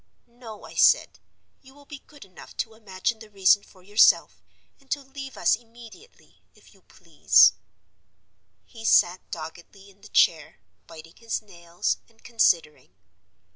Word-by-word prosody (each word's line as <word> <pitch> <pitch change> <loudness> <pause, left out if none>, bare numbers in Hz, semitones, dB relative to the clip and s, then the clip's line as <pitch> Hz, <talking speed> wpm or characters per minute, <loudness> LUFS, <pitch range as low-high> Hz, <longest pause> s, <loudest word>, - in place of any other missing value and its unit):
'No,' 235 -3 -13
I - - -13
said. - - +3 0.4
'You 265 0 -19
will 285 0 -19
be 285 -1 -11
good 290 -8 -16
enough 185 -2 -16
to 225 - -4
imagine 220 +1 -4
the 220 -1 -14
reason 200 0 +3
for 185 -2 -22
yourself, 205 +3 +3 0.4
and 275 -2 -28
to 285 0 -3
leave 270 0 -10
us - - +2
immediately, 235 - -18
if - - -22
you - - -25
please.' - - +3 1.1
He 225 -3 -14
sat 180 -4 +3
doggedly 170 +5 -11
in 200 +1 -28
the - - -15
chair, - - +1 0.3
biting 165 0 -14
his 230 -1 -5
nails 175 -1 -4
and 225 -1 -29
considering. 175 -10 0
220 Hz, 145 wpm, -24 LUFS, 185-240 Hz, 1.1 s, said